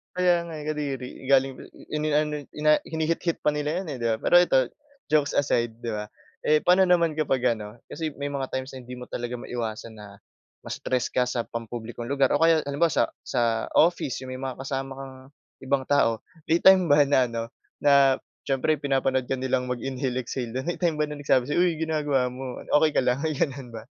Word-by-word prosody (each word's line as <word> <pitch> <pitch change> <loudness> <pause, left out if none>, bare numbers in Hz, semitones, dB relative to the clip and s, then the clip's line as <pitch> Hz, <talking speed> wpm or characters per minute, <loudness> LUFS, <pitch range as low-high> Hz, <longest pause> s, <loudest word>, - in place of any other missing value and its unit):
Kaya 180 -1 +3
nga, 170 -1 -8
eh, 150 - -7
kadiri, 140 -4 -3 0.2
galing 135 0 +4
p - - -17 0.3
ini-ano 150 -1 0
i-na 150 0 +2
hinihit-hit 165 +1 -1
pa 150 - +4
nila 150 +3 -1
'yon, 190 - -5
eh, - - -5
'di - - +1
ba? 110 - +1
Pero 175 - +3
ito 135 - +3 0.5
jokes 150 -2 +2
aside, 120 -5 0
'di 120 -1 -4
ba. 105 0 -5 0.3
Eh 155 0 +4
paano 180 +2 +5
naman 170 -3 +3
kapag 130 -5 +1
ano, 105 +1 -9
kasi 160 -2 -4
may 140 - -3
mga 135 -2 -3
times 130 +1 -4
na - - -7
hindi 125 +1 -9
mo 125 - -7
talaga 120 0 -4
maiwasan 115 -2 -5
na 100 -2 -12 0.5
ma-stress 130 -1 -1
ka 125 - +3
sa 120 -2 -2
pampublikong 115 +1 -6
lugar 140 -2 +2
o 145 - +1
kaya 165 -1 +5
halimbawa 145 +4 +2
sa - - +3 0.2
sa 115 -3 0
office 165 -6 +3
yung 130 - -7
may 130 - -7
mga 130 -2 -4
kasama 135 0 -4
kang 135 -1 -8 0.5
ibang 135 0 0
tao. 115 -6 +2 0.3
May 165 - +5
time 185 -4 +6
ba 145 0 +6
na 140 - +3
ano 115 -1 -3 0.4
na 140 -2 +5 0.2
siyempre 140 +3 +1
pinapanood 135 -2 0
ka 135 - +1
nilang 130 -1 -1
mag-inhale 130 0 -2
exhale 120 -1 -4
do'n. 130 +5 -4
May 175 - -1
time 170 -3 +1
ba 150 - +2
na 150 0 -7
nagsabi 130 -3 +3
sayo, 150 +4 +1
"Uy 170 -3 +1
ginagawa 150 -5 0
mo, 130 -1 -6 0.2
okey 155 - +5
ka - - +6
lang?" 125 +4 +1
May 155 -3 -1
gano'n 135 -3 -2
ba? 115 0 -9
135 Hz, 205 wpm, -26 LUFS, 125-155 Hz, 0.5 s, time